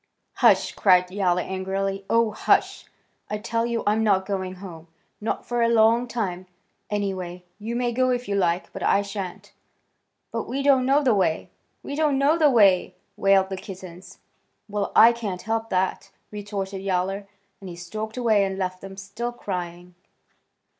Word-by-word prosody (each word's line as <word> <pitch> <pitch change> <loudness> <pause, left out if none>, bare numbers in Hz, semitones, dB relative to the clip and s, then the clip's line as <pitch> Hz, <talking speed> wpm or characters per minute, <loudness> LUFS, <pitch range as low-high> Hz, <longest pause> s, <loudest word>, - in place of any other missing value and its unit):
"Hush!" - - +4
cried 180 -2 +3
Yowler 180 -2 +1
angrily. 195 +1 -3
"Oh, 230 -1 +3
hush! - - +1 0.4
I 210 - -2
tell 230 +2 -1
you 235 -1 -2
I'm 215 +2 +2
not 195 -3 +2
going 190 -2 -3
home. 175 -4 -10 0.3
Not 220 - -3
for 240 -1 -1
a 230 - +3
long 230 +1 +4
time, 185 -6 -3 0.4
anyway. 185 -4 -3 0.2
You 225 +3 -4
may 245 0 0
go 255 +2 +1
if 245 0 -1
you 200 - -2
like, 180 -2 0
but - - -7
I 200 - +3
shan't." 195 -3 -7 0.8
"But - - -3
we 275 +3 -2
don't 265 -2 +4
know 285 +2 +4
the 255 -4 +4
way! 175 -6 0 0.3
We - - -6
don't 300 -2 +2
know 280 +3 +3
the 310 -3 +4
wa 240 -5 +4
y - - +10
y 185 - 0
y!" - - -20 0.2
wailed 195 -2 +3
the 190 - -4
kittens. 185 -1 -10 0.5
"Well, 205 -1 -2
I 230 - +8
can't 205 -6 -5
help 225 0 -2
that," 185 0 -1 0.2
retorted 200 -2 -5
Yowler, 195 +1 -1 0.3
and 195 - -9
he 175 - -8
stalked 215 +6 -6
away 220 -5 +3
and 195 -1 -2
left 185 -1 -3
them 195 0 -10
still 205 +5 -5
crying. 180 -5 -6
200 Hz, 175 wpm, -24 LUFS, 185-230 Hz, 0.8 s, y